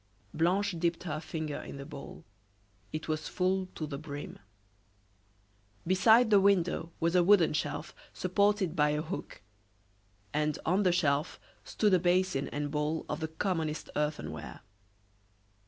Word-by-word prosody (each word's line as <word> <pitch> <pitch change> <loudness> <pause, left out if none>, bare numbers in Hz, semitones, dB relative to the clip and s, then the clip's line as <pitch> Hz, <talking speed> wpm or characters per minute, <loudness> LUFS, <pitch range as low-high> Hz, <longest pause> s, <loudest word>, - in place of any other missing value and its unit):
Blanche 180 +4 +1
dipped 170 0 0
her 155 -3 -3
finger 155 -2 -4
in - - -8
the 140 - -7
bowl; 140 - -10 0.7
it 155 - -5
was 155 0 -2
full 185 0 0
to 155 - -3
the 140 -2 -6
brim. 145 -1 -7 1.5
Beside 220 +6 +5
the 205 - +7
window 180 -4 +2
was 165 +2 +1
a 180 - +5
wooden 180 -4 +5
shelf 150 0 -3 0.2
supported 200 -1 +1
by 150 -2 +3
a 150 +1 -1
hook, 165 - -7 0.9
and 150 0 0
on 185 +5 +2
the 185 -3 +3
shelf 150 -3 +1 0.2
stood 210 -3 +1
a 185 - +6
basin 180 -4 +1
and 145 0 -3
bowl 150 +2 -1
of - - -3
the 160 - -2
commonest 160 -2 -2
earthenware. 150 0 -3
165 Hz, 140 wpm, -31 LUFS, 150-185 Hz, 1.5 s, the